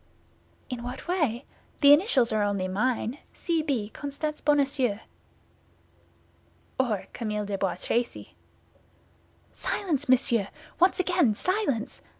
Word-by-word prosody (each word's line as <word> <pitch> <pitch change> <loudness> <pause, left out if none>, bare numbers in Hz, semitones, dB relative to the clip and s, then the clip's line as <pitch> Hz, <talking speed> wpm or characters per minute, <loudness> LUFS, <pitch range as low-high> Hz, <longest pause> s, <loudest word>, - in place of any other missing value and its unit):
"In 250 -3 -5
what 245 +5 -7
way? 295 -9 0 0.4
The 285 -1 +9
initials 290 - +3
are 215 -1 +1
only 200 -2 0
mine—C. 255 - -1
B., 265 -9 -1
Constance 290 +4 -4
Bonacieux." 275 -6 +2 1.8
"Or 225 -7 0
Camille 210 -3 -3
de 200 0 -3
Bois 195 -2 -1
Tracy." 235 +6 -2 1.2
"Silence, 295 -9 -2
monsieur! 240 -5 +3 0.3
Once 360 +2 +4
again, 350 - +2
silence! 365 - -1
255 Hz, 105 wpm, -27 LUFS, 215-300 Hz, 1.8 s, The